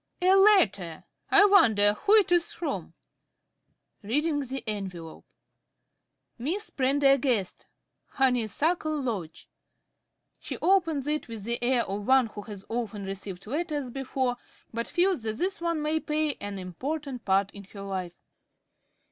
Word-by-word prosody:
_) 360 Hz, -, +2 dB
A 375 Hz, -, +7 dB
letter! 210 Hz, -, +3 dB, 0.3 s
I 405 Hz, 0 st, +7 dB
wonder 220 Hz, -, +5 dB
who 400 Hz, -, +3 dB
it 410 Hz, -5 st, +4 dB
is 345 Hz, -1 st, +2 dB
from! 340 Hz, -, -5 dB, 1.1 s
(Reading 290 Hz, +8 st, 0 dB
the 270 Hz, -2 st, -5 dB
envelope.) 185 Hz, -6 st, -6 dB, 1.1 s
"Miss 355 Hz, -, -3 dB
Prendergast, 270 Hz, -6 st, +1 dB, 0.4 s
Honeysuckle 285 Hz, -, 0 dB
Lodge." 195 Hz, -, -5 dB, 0.9 s
(_She -, -, -5 dB
opens 335 Hz, -7 st, +2 dB
it 300 Hz, +1 st, -1 dB
with 225 Hz, -3 st, -7 dB
the 235 Hz, +2 st, -2 dB
air 245 Hz, -1 st, +2 dB
of 200 Hz, +1 st, -5 dB
one 260 Hz, -1 st, +5 dB
who 210 Hz, -2 st, -8 dB
has 205 Hz, -2 st, -10 dB
often 220 Hz, -4 st, -4 dB
received 195 Hz, -1 st, -7 dB
letters 295 Hz, -, -3 dB
before, 260 Hz, -1 st, -2 dB, 0.4 s
but 230 Hz, +1 st, -3 dB
feels 360 Hz, -4 st, +2 dB
that 220 Hz, -1 st, -3 dB
this 380 Hz, +4 st, -1 dB
one 335 Hz, -3 st, -1 dB
may 310 Hz, +1 st, 0 dB
play 305 Hz, -1 st, -1 dB
an 205 Hz, -1 st, -5 dB
important 255 Hz, -, -5 dB
part 195 Hz, 0 st, +1 dB
in 200 Hz, -1 st, -11 dB
her 200 Hz, +1 st, -11 dB
life. 185 Hz, -3 st, -5 dB
255 Hz, 135 wpm, -27 LUFS, 205-310 Hz, 1.1 s, A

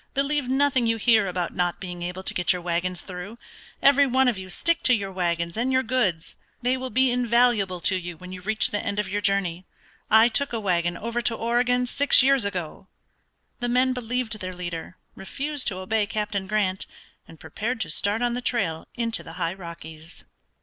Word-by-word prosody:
Believe 280 Hz, -1 st, 0 dB
nothing 265 Hz, -2 st, +2 dB
you 225 Hz, 0 st, +1 dB
hear 220 Hz, -2 st, +4 dB
about 180 Hz, -1 st, -3 dB
not 175 Hz, -1 st, -1 dB
being 180 Hz, -2 st, -7 dB
able 180 Hz, +2 st, -5 dB
to -, -, +2 dB
get 180 Hz, -, +2 dB
your 180 Hz, -1 st, -1 dB
wagons 175 Hz, 0 st, -1 dB
through; 190 Hz, +4 st, -8 dB, 0.5 s
every 280 Hz, 0 st, +6 dB
one 260 Hz, +1 st, +3 dB
of 245 Hz, -, +2 dB
you 190 Hz, -1 st, -8 dB
stick 335 Hz, -, 0 dB
to 255 Hz, -, +5 dB
your 200 Hz, -3 st, -4 dB
wagons 170 Hz, -2 st, -2 dB
and 245 Hz, +4 st, 0 dB
your 260 Hz, 0 st, +2 dB
goods. 210 Hz, -10 st, -1 dB, 0.3 s
They 250 Hz, +1 st, +2 dB
will 260 Hz, 0 st, -5 dB
be 255 Hz, +2 st, +3 dB
invaluable 235 Hz, -6 st, +2 dB
to 190 Hz, -, +3 dB
you 175 Hz, -2 st, -5 dB
when 180 Hz, +2 st, -11 dB
you 185 Hz, 0 st, -8 dB
reach 215 Hz, +3 st, +3 dB
the 205 Hz, -, -2 dB
end 200 Hz, 0 st, -3 dB
of 210 Hz, -2 st, -1 dB
your 205 Hz, +2 st, -2 dB
journey. 190 Hz, -3 st, 0 dB, 0.4 s
I 220 Hz, +2 st, +7 dB
took 275 Hz, +2 st, +1 dB
a 230 Hz, -, -1 dB
wagon 175 Hz, -3 st, 0 dB
over 235 Hz, +2 st, -3 dB
to 230 Hz, 0 st, +1 dB
Oregon 245 Hz, +2 st, +1 dB
six 275 Hz, +1 st, +5 dB
years 270 Hz, -4 st, +3 dB
ago." 185 Hz, -2 st, -5 dB, 0.7 s
The 245 Hz, -, -2 dB
men 255 Hz, +1 st, +2 dB
believed 245 Hz, -2 st, -3 dB
their 185 Hz, -1 st, -6 dB
leader, 175 Hz, 0 st, -6 dB, 0.2 s
refused 280 Hz, +8 st, -4 dB
to 185 Hz, -, -1 dB
obey 205 Hz, +3 st, -1 dB
Captain 210 Hz, -2 st, -3 dB
Grant, 195 Hz, -2 st, 0 dB, 0.4 s
and 165 Hz, -, -15 dB
prepared 235 Hz, +4 st, -4 dB
to 165 Hz, -5 st, -1 dB
start 205 Hz, +8 st, 0 dB
on 240 Hz, -1 st, +1 dB
the 245 Hz, -, -3 dB
trail 190 Hz, -11 st, -1 dB
into 230 Hz, -2 st, 0 dB
the 165 Hz, -, -11 dB
high 165 Hz, +1 st, -2 dB
Rockies. 165 Hz, -3 st, -9 dB
210 Hz, 200 wpm, -25 LUFS, 180-245 Hz, 0.7 s, I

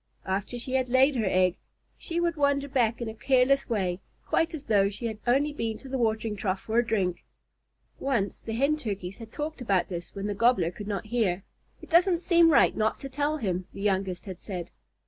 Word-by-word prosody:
After 195 Hz, +5 st, -2 dB
she 255 Hz, +2 st, -5 dB
had 260 Hz, -1 st, +1 dB
laid 265 Hz, +3 st, +4 dB
her 220 Hz, -5 st, 0 dB
egg, 185 Hz, -1 st, +2 dB, 0.4 s
she 335 Hz, 0 st, -3 dB
would 340 Hz, -1 st, +1 dB
wander 280 Hz, -1 st, +1 dB
back 240 Hz, -4 st, +1 dB
in 235 Hz, -, -2 dB
a 220 Hz, -, -4 dB
careless 265 Hz, +3 st, +2 dB
way, 190 Hz, -5 st, 0 dB, 0.3 s
quite 325 Hz, -, +1 dB
as 295 Hz, -, -8 dB
though 200 Hz, -6 st, +3 dB
she 210 Hz, +4 st, -7 dB
had 220 Hz, -2 st, -3 dB
only 280 Hz, +4 st, +3 dB
been 225 Hz, -6 st, -3 dB
to 270 Hz, -, -12 dB
the 265 Hz, 0 st, -3 dB
watering 220 Hz, -2 st, 0 dB
trough 190 Hz, -2 st, -2 dB
for 225 Hz, +2 st, +1 dB
a -, -, +3 dB
drink. 195 Hz, -6 st, -1 dB, 0.8 s
Once 235 Hz, -8 st, -1 dB
the 225 Hz, -, -5 dB
Hen 280 Hz, +6 st, +2 dB
Turkeys 200 Hz, -7 st, -5 dB
had 225 Hz, -1 st, -10 dB
talked 300 Hz, 0 st, -5 dB
about 195 Hz, -6 st, +1 dB
this 175 Hz, -2 st, -6 dB
when 200 Hz, 0 st, -4 dB
the 205 Hz, -, -1 dB
Gobbler 200 Hz, -5 st, +3 dB
could 205 Hz, +3 st, -8 dB
not 205 Hz, 0 st, -3 dB
hear. 215 Hz, -5 st, 0 dB, 0.4 s
"It -, -, -12 dB
doesn't 350 Hz, +1 st, +4 dB
seem 340 Hz, -2 st, +5 dB
right 300 Hz, -, +5 dB
not 215 Hz, 0 st, 0 dB
to 275 Hz, -, -6 dB
tell 290 Hz, +3 st, -1 dB
him," 185 Hz, -7 st, -2 dB
the -, -, -8 dB
youngest 190 Hz, -3 st, -1 dB
had 185 Hz, -3 st, -7 dB
said. 180 Hz, -4 st, -6 dB
225 Hz, 215 wpm, -27 LUFS, 195-275 Hz, 0.8 s, seem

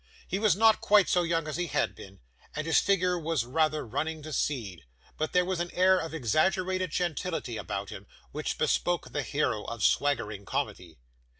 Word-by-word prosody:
He 190 Hz, -, -2 dB
was 210 Hz, -3 st, +3 dB
not 220 Hz, +1 st, +4 dB
quite 205 Hz, -2 st, +5 dB
so 180 Hz, -, +3 dB
young 165 Hz, -2 st, 0 dB
as 155 Hz, -1 st, -3 dB
he 175 Hz, 0 st, -1 dB
had -, -, 0 dB
been, -, -, -13 dB, 0.3 s
and 155 Hz, -, -3 dB
his 160 Hz, -, +4 dB
figure 180 Hz, -2 st, +1 dB
was 160 Hz, -6 st, -1 dB
rather 155 Hz, +3 st, 0 dB
running 155 Hz, +6 st, -3 dB
to 155 Hz, 0 st, -7 dB
seed; 110 Hz, -, -2 dB, 0.3 s
but 155 Hz, 0 st, -2 dB
there 180 Hz, 0 st, +3 dB
was 185 Hz, -1 st, -2 dB
an 175 Hz, 0 st, -2 dB
air 185 Hz, +1 st, +5 dB
of 165 Hz, -3 st, -4 dB
exaggerated 185 Hz, -, +1 dB
gentility 165 Hz, -6 st, -2 dB
about 100 Hz, -1 st, -4 dB
him, 100 Hz, -2 st, -9 dB, 0.2 s
which -, -, -3 dB
bespoke 175 Hz, -2 st, 0 dB
the 145 Hz, -, -1 dB
hero 140 Hz, -7 st, -1 dB
of 115 Hz, -3 st, -5 dB
swaggering 110 Hz, -8 st, +1 dB
comedy. 95 Hz, -, -4 dB
160 Hz, 185 wpm, -29 LUFS, 135-180 Hz, 0.3 s, quite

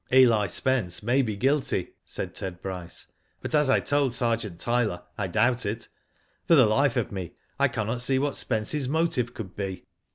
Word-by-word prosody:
" -, -, -25 dB
Eli 120 Hz, -6 st, +5 dB
Spence 95 Hz, -5 st, 0 dB
may 125 Hz, +5 st, +3 dB
be 110 Hz, -5 st, -2 dB
guilty," 130 Hz, -5 st, 0 dB
said -, -, -5 dB
Ted 90 Hz, -2 st, -4 dB
Bryce; 90 Hz, -3 st, -6 dB, 0.4 s
*^but -, -, -4 dB
as 150 Hz, -2 st, +4 dB
I -, -, +5 dB
told 140 Hz, -4 st, +1 dB
Sergeant 115 Hz, -7 st, -1 dB
Tyler, 115 Hz, -7 st, 0 dB
I 100 Hz, -1 st, -2 dB
doubt 120 Hz, +6 st, +2 dB
it. 105 Hz, +1 st, -4 dB, 0.6 s
For 165 Hz, -, +6 dB
the 130 Hz, -5 st, +7 dB
life 120 Hz, +4 st, +2 dB
of -, -, -1 dB
me 95 Hz, -4 st, -5 dB, 0.3 s
I -, -, +5 dB
cannot 115 Hz, +3 st, -2 dB
see 130 Hz, +2 st, +2 dB
what 140 Hz, +1 st, 0 dB
Spence's 125 Hz, +4 st, 0 dB
motive 155 Hz, -6 st, 0 dB
could 95 Hz, -4 st, -7 dB
be." 95 Hz, -2 st, -5 dB
115 Hz, 185 wpm, -26 LUFS, 100-130 Hz, 0.6 s, the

